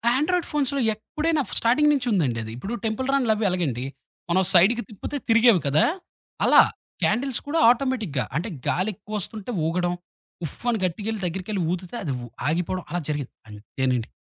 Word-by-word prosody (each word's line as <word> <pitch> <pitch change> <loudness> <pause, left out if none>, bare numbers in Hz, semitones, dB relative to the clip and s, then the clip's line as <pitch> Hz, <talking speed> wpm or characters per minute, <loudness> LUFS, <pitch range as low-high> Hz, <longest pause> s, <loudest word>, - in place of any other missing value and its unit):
Android 340 +5 +1
ఫోన్స్‌లో 280 -2 +1
ఎప్పుడైనా 305 +8 -1 0.2
starting 295 +6 +4
నుంచి 260 -3 -1
ఉందండి 135 - +1
అది. 110 - -7
ఇప్పుడు 200 - -5
టెంపుల్ 225 +4 -1
రన్‌లవ్వి 225 -6 +2
అలాగండి. 145 -9 -1 0.5
మనం 190 +2 +3
సైడ్‌కి 215 +7 +5
తిప్పితే 220 +7 -5
తిరిగేవి 230 -4 +6
కదా! 150 +3 +4 0.6
అలా, - - +8 0.4
క్యాండిల్స్ 265 0 +1
కూడా 325 +3 +1
ఆటోమేటిక్‌గా 235 - +1
అంటే 180 +7 -2 0.2
గాలి 190 +4 +1
ఎక్కువొస్తుంటే 215 +2 -5 0.2
ఊగడం. 175 +1 0 0.5
ఉఫ్ఫ్ 200 - -9
అని 225 -3 +1
గట్టిగెళ్ళి 205 +4 -3
దగ్గరికెళ్ళి 190 +3 -3
ఊదితే 180 +4 -4
అది 145 - -2
ఉ - - -6 0.2
ఆగిపోవడం 175 +3 -1
అలా 175 0 -2
జరిగేది. 145 -4 -3 0.2
అంతేనండి. 120 +3 -2
210 Hz, 150 wpm, -24 LUFS, 170-245 Hz, 0.6 s, అలా